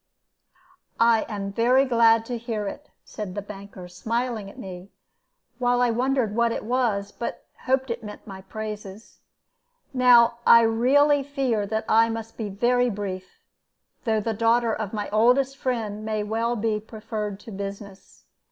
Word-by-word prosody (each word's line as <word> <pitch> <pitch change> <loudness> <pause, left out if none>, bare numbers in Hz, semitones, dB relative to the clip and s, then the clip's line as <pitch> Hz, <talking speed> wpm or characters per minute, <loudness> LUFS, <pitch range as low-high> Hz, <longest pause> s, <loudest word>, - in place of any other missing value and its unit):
"I 230 -1 +4
am 200 -2 -4
very 250 +5 +4
glad 230 -2 +4
to 245 - -4
hear 220 -3 -3
it," 290 +8 -8 0.2
said 205 -4 -7
the 205 - -3
banker, 200 -3 -10
smiling 225 +3 -3
at - - -15
me, 185 0 -9 0.7
while 245 -1 +2
I 245 -1 +3
wondered 245 -2 0
what 235 0 +2
it 230 - -4
was, 230 -5 0
but 235 - -6 0.2
hoped 265 0 +1
that 235 - -2
it - - -21
meant 210 -1 -9
my 195 -2 -9
praises. 210 0 -8 0.7
"Now 240 -2 +5
I 230 - +8
really 270 +6 +4
fear 265 -7 -1
that 220 +2 -2
I 225 +1 +4
must 225 0 -5
be 220 -3 -4
very 245 +5 +2
brief, 195 -3 -6 0.6
though 220 -2 +2
the 225 +2 -2
daughter 230 +1 +2
of 215 -3 -4
my 210 -2 -3
oldest 250 +5 +3
friend 220 -6 -3
may 215 -1 -2
well 225 +3 -1
be 220 -1 -1
preferred 215 -2 -6
to 225 - -11
business. 200 0 -8
225 Hz, 160 wpm, -25 LUFS, 205-240 Hz, 0.7 s, I